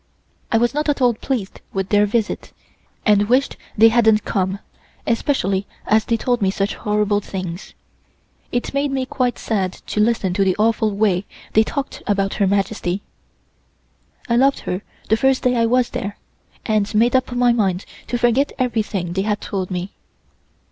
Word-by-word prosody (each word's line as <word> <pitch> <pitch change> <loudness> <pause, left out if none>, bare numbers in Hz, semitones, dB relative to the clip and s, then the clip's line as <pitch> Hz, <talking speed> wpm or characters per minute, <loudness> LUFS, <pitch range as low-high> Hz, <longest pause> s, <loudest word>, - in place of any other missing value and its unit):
I 225 - +4
was 240 +1 +2
not 300 +1 -1
at 290 - +1
all 245 -2 +4
pleased 220 -3 -4
with 195 -1 -2
their 205 0 +4
visit, 215 0 -2 0.5
and 205 0 +4
wished 260 +3 +2 0.2
they 225 +2 +8
hadn't 220 -2 +3
come, 190 -1 -1 0.5
especially 200 -6 0 0.2
as 215 0 +3
they 230 - +1
told 245 +1 0
me 195 - +3
such 195 +2 -1
horrible 210 -1 0
things. 185 -2 -6 0.8
It 245 +2 -2
made 280 +1 +1
me 265 -1 -1
quite 255 -1 -1
sad 190 -5 -1
to - - -5
listen 210 -4 +2
to 195 +1 +2
the 190 -1 +2
awful 220 0 +2
way 200 -2 +1 0.3
they 220 - +6
talked 275 +4 -4
about 195 -1 +1
Her 195 - +4
Majesty. 195 -1 -1 1.2
I 235 - +2
loved 275 +2 +3
her 180 +2 -3 0.3
the 220 - +4
first 265 +2 +2
day 250 0 +3
I 230 -1 +3
was 250 +1 +2
there, 225 -5 -4 0.5
and 215 -1 0
made 235 +4 +4
up 260 -1 +1
my 245 0 +3
mind 195 -5 0 0.2
to 245 - -1
forget 245 +4 +2
everything 215 -8 -1
they 190 - 0
had 210 +1 -1
told 190 -3 -4
me. 185 +1 -4
215 Hz, 170 wpm, -20 LUFS, 195-245 Hz, 1.2 s, they